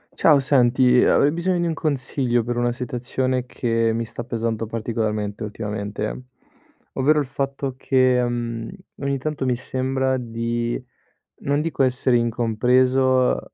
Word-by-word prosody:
Ciao, 150 -3 +5
senti, 125 -2 +4
uhm, - - +4
avrei 145 - +4
bisogno 175 +2 0
di 175 - 0
un 165 - 0
consiglio 130 -5 0
per 120 +1 -3
una 120 0 +1
situazione 125 +1 -2
che 115 -2 0
mi 115 +1 -1
sta 115 +1 -6
pesando 115 -1 -2
particolarmente 110 -1 -3
ultimamente. 105 +2 -4 0.7
Ovvero 150 +3 +3
il 145 - 0
fatto 135 0 -3
che, 130 -2 +3
mhmm, 120 -1 -3 0.3
ogni 140 0 0
tanto 150 -1 -3
mi 125 -1 +1
sembra 130 +1 -1
di, 120 0 -3 0.6
non 145 +1 0
dico 155 -3 -2
essere 125 -1 +2
incompreso, 125 +3 +2
125 Hz, 135 wpm, -22 LUFS, 115-135 Hz, 0.7 s, Ciao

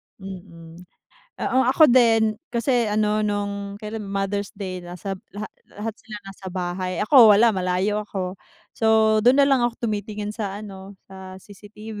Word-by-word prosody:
Mm. 175 -3 -11 0.5
Oo, 260 - 0
ako 265 +2 +5
din, 225 -3 +4
kasi 240 0 0
ano 210 0 +1
no'ng 200 -1 -3
kailan 215 -1 -6
Mother's 200 +1 -3
Day 190 -2 -5
nasa 180 +2 -7 0.2
la 210 +1 -6 0.2
lahat 215 +1 -5
sila 215 - -10
nasa 195 0 -11
bahay, 180 0 -3
ako 220 -2 +7
wala, 230 +3 +5
malayo 190 +2 -1
ako. 185 -2 -5 0.4
So 220 -1 +3
do'n 250 +4 +5
nalang 270 -3 +3
ako 235 0 -4
tumitingin 210 -1 -4
sa 205 -2 -5
ano, 195 -1 -10 0.2
sa 190 -1 -10
CCTV. 210 +1 -11
205 Hz, 145 wpm, -23 LUFS, 190-220 Hz, 0.5 s, ako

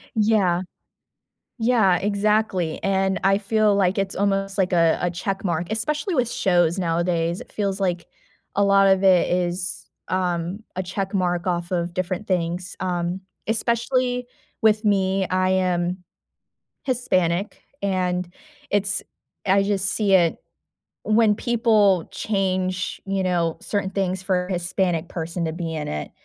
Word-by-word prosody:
Yeah. 205 -5 +2 1.0
Yeah, 220 -7 +4
exactly, 200 -4 0
and 190 0 +1
I 195 0 +4
feel 210 0 +2
like 195 -1 +2
it's 195 -1 -2
almost, 195 0 0
like, 185 -2 +1
a 165 -2 +4
a 175 -1 0
check 195 +3 -3
mark, 170 0 -1
especially 300 - -1
with 245 -2 +1
shows 175 -1 +2
nowadays, 170 0 0
it - - -12
feels 200 -2 -2
like 180 -3 -1 0.5
a 200 - +3
lot 195 0 +5
of 190 0 +3
it 185 -2 +5
is, 180 0 -2 0.2
um, 180 +2 -2
a 185 - -1
check 190 +2 -4
mark 175 -2 0
off 175 -1 -1
of 170 -1 -1
different 185 +2 -3
things, 180 0 -2
um, 180 0 -2 0.2
especially 245 +2 0 0.4
with 215 0 +4
me, 195 -2 +1
I 185 0 +1
am 180 -1 0 0.8
Hispanic, 190 -7 0 0.2
and 180 -2 0 0.4
it's 200 -1 +1 0.4
I 195 +1 +4
just 195 -1 0
see 205 -3 +1
it 175 -3 +4 0.7
when 215 -1 +4
people 215 -6 +2
change, 185 -2 -1
you 195 -1 0
know, 170 -3 0
certain 200 -2 -2
things 190 -1 -1
for 185 -1 0
a 195 - -7
Hispanic 175 -1 -1
person 170 0 -3
to 160 - -2
be 165 -1 -4
in 155 -2 -4
it. 75 0 -4
190 Hz, 140 wpm, -23 LUFS, 175-200 Hz, 1.0 s, lot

